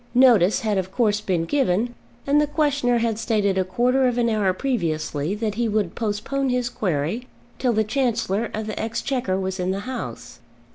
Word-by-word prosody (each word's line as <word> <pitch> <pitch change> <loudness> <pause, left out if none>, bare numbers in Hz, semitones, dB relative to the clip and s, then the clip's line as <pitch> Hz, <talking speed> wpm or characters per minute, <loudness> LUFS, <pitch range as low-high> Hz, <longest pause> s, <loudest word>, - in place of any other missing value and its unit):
Notice 230 -7 +5
had 210 -3 +1
of 185 0 -4
course 210 -2 +1
been 180 -5 0
given, 240 - +1 0.3
and 290 +2 +4
the 300 - +1
questioner 285 -5 +1
had 225 -2 0
stated 210 -4 +1
a - - +3
quarter 250 +8 +2
of 245 -1 0
an 235 -1 +2
hour 205 -3 +2
previously 170 - -1
that 215 -1 -2
he 230 +1 0
would 205 -5 0
postpone 235 +5 -2
his 250 0 0
query 185 - -2 0.3
till 250 -2 +2
the 220 0 +2
Chancellor 230 -3 0
of 215 0 -4
the 215 - -5
Exchequer 225 -3 -1
was 190 0 -3
in 180 0 -1
the 195 +1 -1
House. 240 - -6
220 Hz, 185 wpm, -23 LUFS, 190-250 Hz, 0.3 s, Notice